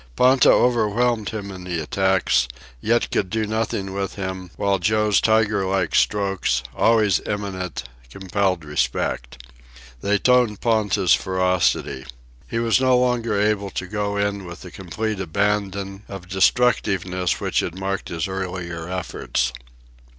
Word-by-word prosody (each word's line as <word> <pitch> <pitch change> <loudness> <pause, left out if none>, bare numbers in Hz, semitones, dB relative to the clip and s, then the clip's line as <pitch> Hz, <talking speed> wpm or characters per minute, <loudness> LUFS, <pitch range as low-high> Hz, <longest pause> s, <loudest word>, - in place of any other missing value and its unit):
Ponta 130 +1 +5
overwhelmed 120 -1 +2
him 100 -2 -5
in 95 -1 -9
the 90 -2 -3
attacks, 95 -5 +1 0.3
yet 115 - +1
could 95 - 0
do 110 +1 -1
nothing 105 -2 -2
with 100 0 -3
him, 95 -2 -5
while 100 -1 +1
Joe's 105 +3 +2
tiger 110 -2 +2
like 95 -3 0
strokes, 95 - +1
always 110 -4 +3
imminent, 95 -7 -4 0.3
compelled 95 +1 -1
respect. 65 -3 -2 0.6
They 105 +1 +2
toned 125 -2 +3
Ponta's 105 -6 +2
ferocity. 90 -7 0 0.4
He 115 - -3
was 115 +2 +2
no 130 -1 +4
longer 120 -4 +1
able 105 -1 +1
to 95 - -4
go 100 +1 -2
in 100 -1 -1
with 85 0 -9
the 90 - -10
complete 105 +3 -4
abandon 100 +1 -1
of 95 -2 -9
destructiveness 95 -3 +1
which - - 0
had 85 - -3
marked 95 0 -3
his 80 0 -2
earlier 90 -3 -5
efforts. 85 -8 -2
100 Hz, 135 wpm, -22 LUFS, 90-110 Hz, 0.6 s, Ponta